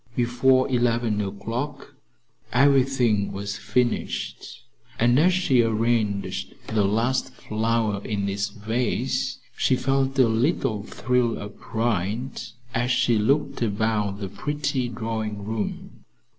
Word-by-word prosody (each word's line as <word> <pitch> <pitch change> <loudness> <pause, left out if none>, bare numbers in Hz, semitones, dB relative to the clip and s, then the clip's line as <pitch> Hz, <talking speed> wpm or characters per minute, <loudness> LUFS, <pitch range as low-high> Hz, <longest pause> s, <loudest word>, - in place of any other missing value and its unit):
Before 130 +2 +3
eleven 120 -4 +1
o'clock 115 +8 -4 0.6
everything 130 -5 +3
was 100 +1 -4
finished, 120 +3 -2 0.3
and 120 +3 +4
as 180 +4 +5
she 170 -9 +3
arranged 110 -3 0
the 110 -2 +1
last 120 +6 +1
flower 110 -2 -1
in 100 -2 -2
its 100 +1 -1
vase 125 +4 -1 0.2
she 130 - +2
felt 135 +1 0
a 130 -3 +6
little 115 - +1
thrill 120 +2 0
of 105 0 -9
pride 115 +2 -2 0.3
as 120 +2 0
she 120 -2 +3
looked 140 +8 +1
about 105 -2 0
the 100 - -3
pretty 140 +4 -2
drawing 110 -3 -4
room. 110 -1 -4
115 Hz, 115 wpm, -25 LUFS, 105-130 Hz, 0.6 s, a